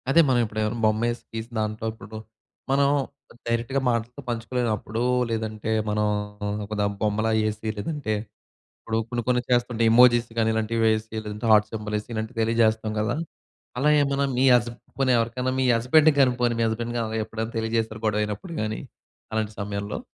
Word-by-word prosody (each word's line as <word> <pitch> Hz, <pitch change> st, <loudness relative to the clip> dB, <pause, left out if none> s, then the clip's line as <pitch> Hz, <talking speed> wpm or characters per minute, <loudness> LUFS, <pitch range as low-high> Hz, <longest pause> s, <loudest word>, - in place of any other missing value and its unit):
అదే 165 Hz, +5 st, +6 dB
మనం 130 Hz, -2 st, +3 dB
ఎప్పుడు 110 Hz, 0 st, -5 dB
ఏమైనా 110 Hz, +2 st, -1 dB
బొమ్మేసి, 115 Hz, +2 st, +1 dB
గీసిన 115 Hz, +1 st, -6 dB
దాంట్లో 110 Hz, +1 st, -2 dB
ఇప్పుడు 110 Hz, 0 st, -10 dB, 0.5 s
మనం 140 Hz, +1 st, +4 dB, 0.6 s
డైరెక్ట్‌గా 115 Hz, +4 st, 0 dB
మాటలతో 120 Hz, +3 st, -2 dB
పంచుకోలేనప్పుడు, 115 Hz, -1 st, -2 dB, 0.3 s
లేదంటే, 110 Hz, -1 st, -3 dB, 0.2 s
మనం 105 Hz, 0 st, +1 dB, 0.6 s
ఒక 105 Hz, +1 st, -5 dB, 0.2 s
బొమ్మలా 110 Hz, +1 st, +1 dB, 0.2 s
ఎసి, 110 Hz, +1 st, -6 dB
లేదంటే 120 Hz, +1 st, -2 dB, 0.7 s
ఇప్పుడు 110 Hz, 0 st, -2 dB
కొన్ని 120 Hz, -1 st, -2 dB
కొన్ని 125 Hz, -1 st, +2 dB
చేస్తుంటే, 120 Hz, -1 st, +1 dB
ఎమోజీస్ 120 Hz, 0 st, +6 dB
గాని 110 Hz, 0 st, +2 dB
ఇలాంటివి 110 Hz, +1 st, -1 dB
వేసి, 110 Hz, 0 st, 0 dB
లేదంటే 105 Hz, +2 st, -4 dB
హార్ట్ 105 Hz, 0 st, +5 dB
సింబాలేసి 105 Hz, 0 st, -4 dB
ఇలాంటివి 110 Hz, +2 st, -4 dB
తెలియజేస్తాం 110 Hz, -1 st, +2 dB
గదా! 110 Hz, +3 st, 0 dB, 0.6 s
అలా 140 Hz, +4 st, +3 dB
ఏమన్నా 140 Hz, 0 st, +1 dB
మీ 130 Hz, -, +4 dB
హస్బ 120 Hz, 0 st, +1 dB
గాని, 120 Hz, -, -26 dB
పోనీ 135 Hz, -1 st, +3 dB
ఎవరికైనా 125 Hz, +3 st, -1 dB
మీ -, -, +2 dB
హస్బెండ్‌కి 145 Hz, +6 st, +4 dB
గాని, 130 Hz, -2 st, +4 dB
పోనీ 120 Hz, -1 st, +3 dB
మీ -, -, +3 dB
హస్బెండ్‌ 115 Hz, +2 st, -3 dB
గాని, 110 Hz, -1 st, -2 dB
ఎప్పుడైనా 110 Hz, +1 st, -4 dB
తెలియజేసారా? 110 Hz, -1 st, -1 dB
గొడవ 105 Hz, 0 st, +1 dB
అయినప్పుడు 105 Hz, -, -5 dB
గాని, 110 Hz, 0 st, -3 dB, 0.5 s
అలాంటి 110 Hz, -1 st, -1 dB
సమయంలో? 100 Hz, 0 st, -4 dB
115 Hz, 160 wpm, -25 LUFS, 110-120 Hz, 0.7 s, అదే